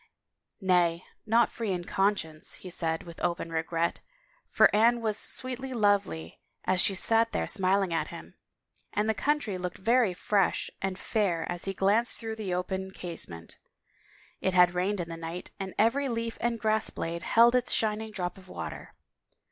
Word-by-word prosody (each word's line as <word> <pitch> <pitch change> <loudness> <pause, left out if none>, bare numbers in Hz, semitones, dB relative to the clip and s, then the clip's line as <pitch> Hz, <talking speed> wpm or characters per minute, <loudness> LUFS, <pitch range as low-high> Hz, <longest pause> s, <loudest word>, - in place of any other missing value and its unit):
" - - -59
Nay, 180 -3 +2 0.2
not 230 +2 +4
free 225 -4 -3
in 180 -1 -2
conscience," 175 -5 -1
he 185 - -10
said 165 -2 -1
with 170 -1 -11
open 170 -1 -2
re 160 -1 0
gret, 165 +1 -2 0.5
for - - +6
Anne 235 +3 +4
was 220 -2 0
sweetly 260 +3 +2
lovely 200 - 0 0.3
as 185 -1 +2
she 195 - +2
sat 225 +4 +3
there - - 0
smil 195 -1 +1
ing 180 -3 -3
at 165 - 0
him, - - -10 0.6
and 210 +1 0
the 220 - +2
country 255 -7 -1
looked 180 0 -4
very 225 -2 +2
fresh 195 +1 +1
and 190 -1 -2
fair 195 -6 0
as 175 -1 -4
he 195 - -2
glanced 210 +6 +2
through 225 -1 -5
the 205 -4 -4
open 190 +1 -2
casement. 165 - -5 0.8
It 190 -1 -1
had 180 -1 +6
rained 185 +3 0
in 170 - -3
the 165 0 -7
night 165 +2 -6
and 190 -1 -5
every 260 +6 +2
leaf 230 -1 -3
and 235 0 0
grass 220 0 +2
blade 170 +1 -4
held 235 +7 +5
its 250 -1 +2
shining 220 0 0
drop 185 -3 -4
of 185 -1 -17
water. - - -7
195 Hz, 180 wpm, -28 LUFS, 175-225 Hz, 0.8 s, for